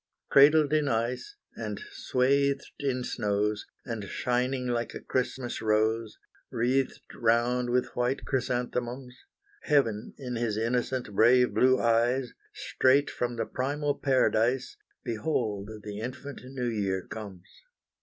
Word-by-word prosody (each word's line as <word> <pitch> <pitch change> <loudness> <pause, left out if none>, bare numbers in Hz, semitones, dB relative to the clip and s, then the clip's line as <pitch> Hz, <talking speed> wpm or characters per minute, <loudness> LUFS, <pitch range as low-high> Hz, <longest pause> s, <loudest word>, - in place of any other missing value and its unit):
Cradled 150 +1 +6
in 150 -2 +2
ice, 125 - -2 0.2
and - - -5
swathed 140 - +1
in 130 -3 -1
snows, 105 -1 -1 0.2
And 115 -4 -4
shining 125 +4 -1
like 120 -1 -2
a - - -5
Christmas 130 -1 -2
rose, 110 0 +1 0.3
Wreathed 130 +3 0
round 120 +2 +1
with 125 +1 0
white 125 +3 -1
chrysanthemums; 125 -1 -2 0.5
Heaven 115 -8 +1
in 125 -3 -4
his 115 -3 -1
innocent, 120 0 -1
brave 120 +2 +5
blue 130 +4 +4
eyes, 120 +2 +2 0.2
Straight 135 +2 +2
from 120 0 -2
the 115 -1 -2
primal 145 +4 -1
paradise, 130 -2 +1 0.3
Behold 110 -4 -2
the 105 0 -6
infant 130 +4 -6
New 130 -1 -4
Year 100 -5 -1
comes! 100 -5 -9
125 Hz, 120 wpm, -28 LUFS, 115-130 Hz, 0.5 s, Cradled